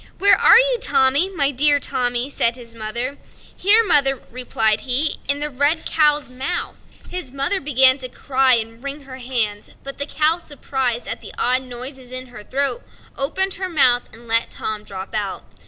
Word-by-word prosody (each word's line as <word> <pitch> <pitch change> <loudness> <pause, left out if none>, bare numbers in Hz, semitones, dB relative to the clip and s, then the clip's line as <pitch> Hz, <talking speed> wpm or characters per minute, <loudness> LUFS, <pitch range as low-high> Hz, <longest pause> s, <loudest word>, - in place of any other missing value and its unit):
"Where 405 +1 +5
are - - +6
you, - - +2
Tommy, 280 - +2
my 290 -7 -1
dear 290 +2 +3
Tommy?" 245 -1 -1
said 235 -4 +1
his 235 -2 -11
mother. 235 +5 -4 0.4
"Here, 425 +5 +6
mother," 275 -7 +3
replied 220 -3 +1
he, 270 +4 +1
"in 285 +1 +2
the 300 - -2
red 290 +5 0
cow's 300 -2 +1
mouth." 265 +8 -5 0.3
His 360 -8 -3
mother 275 +8 -1
began 265 -1 +5
to 255 -1 -5
cry 260 0 +2
and 225 +1 -4
wring 280 +1 -6
her 260 -1 -11
hands; 230 -5 -3
but 275 0 -8
the 285 - -1
cow, 315 +3 0
surprised 265 -6 -4
at - - -4
the - - -10
odd 255 +1 +2
noise 255 +2 -6
in 255 0 -6
her 245 -3 -11
throat, 265 +3 -2 0.3
opened 380 +8 0
her 375 - -2
mouth 250 -7 +2
and 235 +1 -16
let 230 0 +2
Tom 215 -1 -5
drop 190 0 -9
out. 205 -3 -4
265 Hz, 180 wpm, -19 LUFS, 245-295 Hz, 0.4 s, are